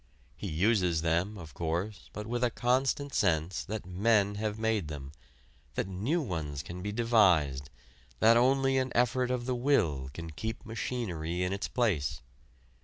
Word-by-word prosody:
He 100 Hz, -, -6 dB
uses 90 Hz, -1 st, +2 dB
them, 85 Hz, +6 st, 0 dB
of 80 Hz, -6 st, -10 dB
course, 85 Hz, +7 st, -3 dB
but 105 Hz, -, -6 dB
with 120 Hz, +2 st, -2 dB
a 125 Hz, -, +4 dB
constant 130 Hz, +4 st, 0 dB
sense 80 Hz, -4 st, +1 dB
that 105 Hz, 0 st, -5 dB
men 100 Hz, +2 st, +2 dB
have 105 Hz, +1 st, -2 dB
made 110 Hz, -6 st, 0 dB
them, 70 Hz, -2 st, -7 dB, 0.6 s
that -, -, -1 dB
new 115 Hz, -, -1 dB
ones 75 Hz, -, -4 dB
can 90 Hz, +1 st, -7 dB
be 105 Hz, +2 st, -3 dB
devised, 90 Hz, -, +3 dB, 0.5 s
that 115 Hz, +1 st, +6 dB
only 135 Hz, +2 st, +3 dB
an 130 Hz, -1 st, -1 dB
effort 125 Hz, +1 st, +2 dB
of 125 Hz, -1 st, -1 dB
the 130 Hz, -, 0 dB
will 105 Hz, -, +1 dB
can 80 Hz, +3 st, -7 dB
keep 110 Hz, +10 st, -5 dB
machinery 90 Hz, -8 st, -3 dB
in 90 Hz, +1 st, 0 dB
its 100 Hz, -, -2 dB
place. 85 Hz, -, 0 dB
105 Hz, 160 wpm, -30 LUFS, 85-120 Hz, 0.6 s, that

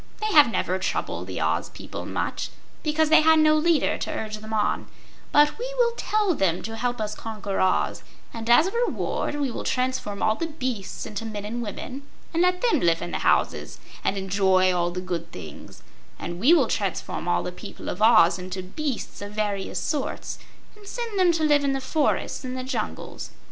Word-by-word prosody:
They 430 Hz, 0 st, -1 dB
have 295 Hz, -5 st, +8 dB
never 185 Hz, -3 st, 0 dB
troubled 185 Hz, -, -2 dB
the -, -, -4 dB
Oz -, -, 0 dB
people -, -, -8 dB
much, -, -, -2 dB, 0.3 s
because 310 Hz, 0 st, +1 dB
they 315 Hz, -, +8 dB
had 320 Hz, +1 st, +6 dB
no 310 Hz, 0 st, +5 dB
leader 320 Hz, 0 st, +2 dB
to -, -, -3 dB
urge 215 Hz, -1 st, -4 dB
them 215 Hz, +1 st, -10 dB
on, 210 Hz, -1 st, 0 dB, 0.4 s
but 295 Hz, +6 st, +4 dB
we -, -, -3 dB
will 475 Hz, -1 st, +3 dB
tell 420 Hz, -5 st, +1 dB
them 185 Hz, -, 0 dB
to 225 Hz, 0 st, -5 dB
help 245 Hz, +1 st, -2 dB
us 210 Hz, -1 st, -2 dB
conquer 210 Hz, -3 st, -4 dB
Oz 185 Hz, -, +1 dB, 0.3 s
and 230 Hz, 0 st, -5 dB
as 240 Hz, +7 st, +7 dB
a 380 Hz, -, -1 dB
reward 470 Hz, -9 st, -1 dB
we 285 Hz, -3 st, -1 dB
will -, -, -5 dB
transform 255 Hz, -5 st, -1 dB
all 215 Hz, -, +4 dB
the 330 Hz, +9 st, -3 dB
beasts 255 Hz, -10 st, -4 dB
into 210 Hz, +1 st, -5 dB
men 210 Hz, -2 st, -5 dB
and 235 Hz, +3 st, -3 dB
women, 250 Hz, +5 st, -6 dB, 0.3 s
and 330 Hz, -, +2 dB
let 360 Hz, 0 st, +2 dB
them 485 Hz, -2 st, +3 dB
live 170 Hz, -1 st, +2 dB
in 175 Hz, -, -5 dB
the -, -, -2 dB
houses -, -, +1 dB, 0.3 s
and 200 Hz, -, 0 dB
enjoy 190 Hz, -1 st, +3 dB
all 175 Hz, -1 st, +1 dB
the 180 Hz, +1 st, -4 dB
good 170 Hz, -2 st, -4 dB
things; 75 Hz, -2 st, -10 dB, 0.3 s
and 175 Hz, 0 st, -5 dB
we 250 Hz, -, +5 dB
will 345 Hz, -, +6 dB
transform -, -, -2 dB
all -, -, +2 dB
the -, -, -4 dB
people -, -, -9 dB
of -, -, -4 dB
Oz 215 Hz, -6 st, +6 dB
into 185 Hz, +1 st, -5 dB
beasts 260 Hz, +7 st, -4 dB
of 205 Hz, 0 st, -7 dB
various 205 Hz, -2 st, -2 dB
sorts, 295 Hz, -3 st, -3 dB, 0.4 s
and 415 Hz, -1 st, -16 dB
send 460 Hz, -2 st, -4 dB
them 360 Hz, -2 st, +5 dB
to 325 Hz, -1 st, 0 dB
live 295 Hz, -2 st, +4 dB
in 275 Hz, -1 st, +1 dB
the 270 Hz, -, -1 dB
forests 290 Hz, +3 st, 0 dB
and 255 Hz, 0 st, -4 dB
the 255 Hz, -, -3 dB
jungles. 260 Hz, -, -4 dB
240 Hz, 200 wpm, -25 LUFS, 200-310 Hz, 0.4 s, have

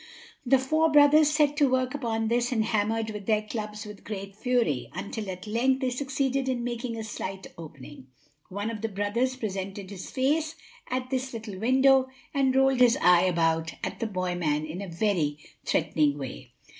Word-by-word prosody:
The 270 Hz, +1 st, +4 dB
four 310 Hz, +5 st, +2 dB
brothers 295 Hz, +1 st, +6 dB
set 300 Hz, -1 st, +2 dB
to 285 Hz, -2 st, +4 dB
work 255 Hz, 0 st, +1 dB
upon 225 Hz, -5 st, -1 dB
this 240 Hz, +2 st, +1 dB
and 220 Hz, -3 st, +1 dB
hammered 220 Hz, +1 st, 0 dB
with 210 Hz, -2 st, -8 dB
their 215 Hz, -1 st, +2 dB
clubs 210 Hz, -1 st, -5 dB
with 210 Hz, -1 st, -10 dB
great 195 Hz, -2 st, -6 dB
fury, 235 Hz, -, 0 dB
until 210 Hz, -1 st, -5 dB
at 185 Hz, +1 st, -6 dB
length 255 Hz, +5 st, +1 dB
they 255 Hz, -1 st, 0 dB
succeeded 270 Hz, 0 st, -1 dB
in 245 Hz, -2 st, -1 dB
making 240 Hz, -1 st, -3 dB
a 220 Hz, -, -4 dB
slight 195 Hz, -3 st, -6 dB
opening. 145 Hz, -4 st, -11 dB, 0.4 s
One 205 Hz, +4 st, -3 dB
of 215 Hz, -2 st, -6 dB
the 225 Hz, -, -2 dB
brothers 210 Hz, +6 st, -1 dB
presented 195 Hz, -3 st, -5 dB
his 190 Hz, -2 st, -7 dB
face 300 Hz, +4 st, 0 dB, 0.3 s
at 255 Hz, 0 st, -3 dB
this 260 Hz, 0 st, -2 dB
little 215 Hz, -4 st, -7 dB
window 260 Hz, +3 st, +4 dB, 0.3 s
and 270 Hz, -2 st, +2 dB
rolled 270 Hz, -1 st, +4 dB
his 245 Hz, -2 st, +5 dB
eye 175 Hz, +1 st, +5 dB
about 165 Hz, -2 st, +1 dB
at -, -, -4 dB
the 230 Hz, -, -1 dB
boy 185 Hz, -3 st, -2 dB
man 155 Hz, -3 st, 0 dB
in 160 Hz, +5 st, -6 dB
a 200 Hz, -, -5 dB
very 170 Hz, -5 st, 0 dB, 0.3 s
threatening 150 Hz, -2 st, +1 dB
way. 135 Hz, -3 st, -8 dB
225 Hz, 180 wpm, -27 LUFS, 190-260 Hz, 0.4 s, brothers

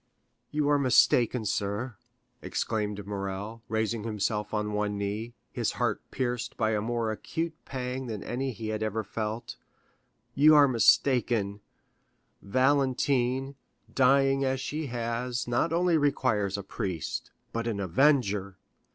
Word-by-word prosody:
50093m -, -, -46 dB, 0.4 s
"You 150 Hz, -1 st, 0 dB
are 145 Hz, -1 st, +4 dB
mistaken, 125 Hz, -3 st, +4 dB
sir," 105 Hz, +4 st, -2 dB, 0.5 s
exclaimed 105 Hz, -2 st, -2 dB
Morrel, 100 Hz, +2 st, -5 dB
raising 110 Hz, 0 st, -1 dB
himself 105 Hz, -1 st, -2 dB
on 105 Hz, -1 st, -1 dB
one 105 Hz, 0 st, -1 dB
knee, 105 Hz, +4 st, -3 dB, 0.2 s
his -, -, -1 dB
heart -, -, -1 dB
pierced 120 Hz, -2 st, -3 dB
by 110 Hz, -, +1 dB
a 105 Hz, -1 st, 0 dB
more 115 Hz, 0 st, -1 dB
acute 160 Hz, +9 st, -3 dB
pang 130 Hz, 0 st, -4 dB
than 110 Hz, -4 st, -5 dB
any 130 Hz, +2 st, -2 dB
he 110 Hz, -2 st, -6 dB
had 110 Hz, 0 st, -2 dB
yet 110 Hz, -2 st, -1 dB
felt—"you 115 Hz, +7 st, -1 dB
are 145 Hz, -1 st, +7 dB
mistaken; 115 Hz, -4 st, +3 dB, 0.8 s
Valentine, 130 Hz, +1 st, +1 dB, 0.4 s
dying 135 Hz, +1 st, +4 dB
as 130 Hz, 0 st, 0 dB
she 150 Hz, +3 st, -3 dB
has, 120 Hz, 0 st, -2 dB
not 120 Hz, +7 st, +1 dB
only 170 Hz, -1 st, +3 dB
requires 110 Hz, -9 st, +1 dB
a 100 Hz, -, -5 dB
priest, 90 Hz, -4 st, -4 dB, 0.2 s
but 115 Hz, 0 st, -2 dB
an 110 Hz, -3 st, -2 dB
avenger. 100 Hz, -, +2 dB
115 Hz, 130 wpm, -28 LUFS, 105-130 Hz, 0.8 s, are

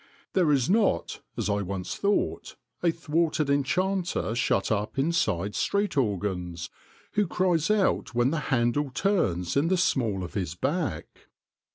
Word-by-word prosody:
There 175 Hz, -5 st, +3 dB
is 135 Hz, -4 st, +2 dB
not, 200 Hz, -, +1 dB, 0.2 s
as -, -, -1 dB
I 100 Hz, 0 st, 0 dB
once 95 Hz, -1 st, -4 dB
thought, 205 Hz, 0 st, -1 dB, 0.3 s
a 175 Hz, -, +3 dB
thwarted 155 Hz, -2 st, 0 dB
enchanter 175 Hz, -, 0 dB
shut 115 Hz, -4 st, +1 dB
up 105 Hz, +2 st, -1 dB
inside 110 Hz, -, +1 dB
street 200 Hz, -, 0 dB
organs 95 Hz, -, -2 dB, 0.4 s
who 210 Hz, -2 st, +1 dB
cries 175 Hz, -2 st, +1 dB
out 205 Hz, -, +1 dB
when 120 Hz, +2 st, +3 dB
the 165 Hz, -, 0 dB
handle 130 Hz, +2 st, +1 dB
turns 120 Hz, -, 0 dB
in 145 Hz, +4 st, +3 dB
the 185 Hz, +2 st, +2 dB
small 115 Hz, -, +1 dB
of 90 Hz, -, -7 dB
his 90 Hz, -5 st, -3 dB
back. 145 Hz, -, -3 dB
135 Hz, 145 wpm, -27 LUFS, -, 0.4 s, There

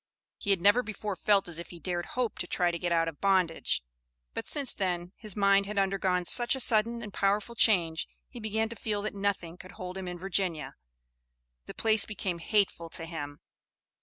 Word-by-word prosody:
He -, -, -4 dB
had 195 Hz, -3 st, +3 dB
never 205 Hz, +6 st, +5 dB
before 210 Hz, -3 st, -5 dB
felt 200 Hz, 0 st, +2 dB
as 170 Hz, -1 st, -1 dB
if 170 Hz, -, -8 dB
he 175 Hz, -, -10 dB
dared 175 Hz, +1 st, -3 dB
hope 245 Hz, -3 st, -1 dB
to 175 Hz, -, 0 dB
try 175 Hz, 0 st, +1 dB
to 170 Hz, -, -4 dB
get 175 Hz, +1 st, -2 dB
out 165 Hz, -1 st, +3 dB
of 165 Hz, -3 st, -6 dB
bondage, 185 Hz, -, +2 dB, 0.5 s
but -, -, -5 dB
since 280 Hz, -3 st, +3 dB
then 180 Hz, -2 st, -2 dB
his 215 Hz, -4 st, -4 dB
mind 200 Hz, -1 st, +4 dB
had 210 Hz, 0 st, -5 dB
undergone 190 Hz, -2 st, +1 dB
such 240 Hz, +8 st, +4 dB
a -, -, -4 dB
sudden 235 Hz, 0 st, +2 dB
and 210 Hz, -3 st, -8 dB
powerful 205 Hz, +3 st, 0 dB
change, 175 Hz, -8 st, +3 dB, 0.2 s
he 245 Hz, -, -10 dB
began 220 Hz, 0 st, -1 dB
to 235 Hz, -, -6 dB
feel 205 Hz, -1 st, -3 dB
that 215 Hz, -, -3 dB
nothing 195 Hz, -4 st, -2 dB
could 185 Hz, 0 st, -12 dB
hold 185 Hz, -2 st, -6 dB
him 185 Hz, -, -6 dB
in 180 Hz, 0 st, -5 dB
Virginia; 185 Hz, -3 st, -1 dB, 0.9 s
the -, -, -8 dB
place 220 Hz, -2 st, +3 dB
became 190 Hz, -5 st, -3 dB
hateful 180 Hz, -2 st, 0 dB
to 165 Hz, -, -3 dB
him. 145 Hz, -3 st, -6 dB
195 Hz, 200 wpm, -29 LUFS, 175-210 Hz, 0.9 s, never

